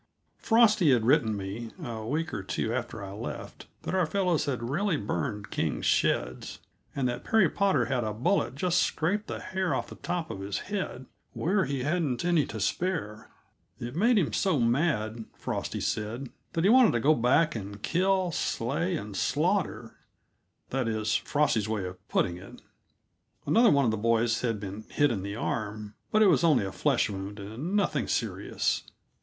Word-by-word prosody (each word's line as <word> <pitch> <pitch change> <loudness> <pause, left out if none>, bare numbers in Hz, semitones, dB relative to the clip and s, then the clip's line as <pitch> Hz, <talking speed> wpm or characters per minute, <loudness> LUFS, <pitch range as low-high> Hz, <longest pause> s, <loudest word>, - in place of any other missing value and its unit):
Frosty 215 - +4
had 120 -4 +3
written 120 -5 +3
me, 100 +4 -5
a 115 -2 -5
week 155 +8 -2
or 105 - -2
two 105 +4 -2
after 120 -4 -4
I 95 - -7
left, 105 +4 -7 0.2
that - - -3
our 185 -3 +2
fellows 180 -3 +1
had 125 -5 -2
really 180 +2 +1
burned 100 - -3
King's - - -1
sheds, - - 0 0.4
and 135 -2 +1
that 120 0 -3
Perry 220 -5 +4
Potter 185 - +2
had 125 -1 -1
a 110 - -2
bullet 130 - 0
just 180 +4 +1
scrape 200 +7 0
the - - -4
hair 190 -2 -1
off - - -3
the - - -9
top 175 -3 -3
of - - -6
his 100 +1 -3 0.2
head, 185 -10 -3 0.3
where 190 +3 +1
he 140 -2 -2
hadn't 150 -4 0
any 170 -6 +3
to 110 - -6
spare. 110 - -2 0.5
It 120 +3 -6
made 225 +7 +4
him 175 -7 +1
so 185 -8 +2
mad, 115 -3 0
Frosty - - -3
said, 115 +5 -3 0.2
that 165 - 0
he 195 - +5
wanted 250 -3 +6
to 120 - +1
go 145 +7 +4
back 150 +5 +3
and 100 -1 -6
kill, 185 +1 +1
slay, 160 +6 -1
and 105 -2 -7
slaughter - - 0 0.7
that 130 -2 0
is 110 -1 0
Frosty's 120 -8 +1
way 105 -4 -1
of 90 0 -9
putting 85 - +1
it. 95 +2 -12 0.9
Another 230 0 +5
one 140 -2 +4
of 115 - +2
the 110 - -1
boys 115 +1 +2
had 115 -4 -1
been 100 +1 -6
hit 145 -2 +2
in 105 -5 -2
the 100 +1 -5
arm, 110 -2 -3 0.2
but 215 0 +5
it - - +6
was 185 - +4
only 145 -11 +4
a 95 - -4
flesh 140 +4 +1
wound 100 0 -6
and 115 - -4
nothing 205 - +1
serious. - - -1
125 Hz, 180 wpm, -28 LUFS, 110-170 Hz, 0.9 s, wanted